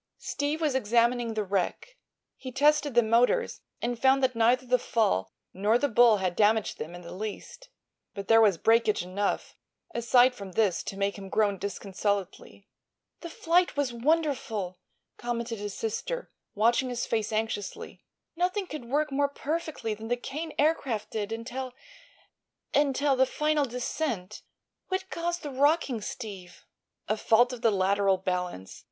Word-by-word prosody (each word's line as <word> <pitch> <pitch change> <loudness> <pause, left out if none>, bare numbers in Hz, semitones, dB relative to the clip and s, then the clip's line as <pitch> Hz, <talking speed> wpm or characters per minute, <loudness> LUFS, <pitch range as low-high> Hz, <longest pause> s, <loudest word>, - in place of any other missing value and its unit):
Steve 290 +2 -2
was 305 -4 +1
examining 235 -1 +1
the 215 - 0
wreck. 200 - -2 0.4
He 260 - -8
tested 290 0 +2
the 240 - +6
motors 245 - +2 0.2
and 240 0 -2
found 270 0 +4
that 255 -1 +2
neither 240 +3 +3
the 250 0 +2
fall 95 - 0 0.2
nor 205 +5 +2
the 285 - +1
bull 235 -3 +5
had 185 -2 -1
damaged 220 +1 +2
them 165 +3 -6
in 175 - -9
the 170 - -9
least. 220 - -7 0.5
But 200 -1 -6
there 225 0 +6
was 205 -6 +4
breakage 225 0 +3
enough, 195 +3 -2 0.4
aside 245 +2 +4
from 200 -5 -9
this, 205 -4 +2
to 195 - -5
make 200 +1 -1
him 195 -1 -9
groan 200 -2 +1
disconsolately. 200 0 -4 0.5
"The 340 - -7
flight 340 0 +1
was 275 -4 0
wonderful," 235 - -1 0.4
commented 235 -2 -3
his 205 -1 -5
sister, - - -4 0.2
watching 235 +4 +2
his 245 -1 -2
face 220 -2 -1
anxiously. 215 -2 -4 0.3
"Nothing 365 +4 0
could 305 -8 -7
work 295 +4 0
more 285 +1 +1
perfectly 300 -5 -3
than 220 +1 -8
the 245 +1 0
Kane 305 +6 -5
Aircraft 275 -8 0
did 215 -1 -3
until—until—the 265 - -2
final 300 +1 +1
descent. 245 -5 -3 0.5
What 375 0 -3
caused 345 +1 -2
the 290 - -5
rocking, 275 -3 +2
Steve?" 200 -6 -8 0.4
"A 215 - +1
fault 240 +3 +3
of 245 - -7
the 230 - +4
lateral 195 -1 +2
balance. 180 - -4
235 Hz, 150 wpm, -28 LUFS, 205-280 Hz, 0.5 s, the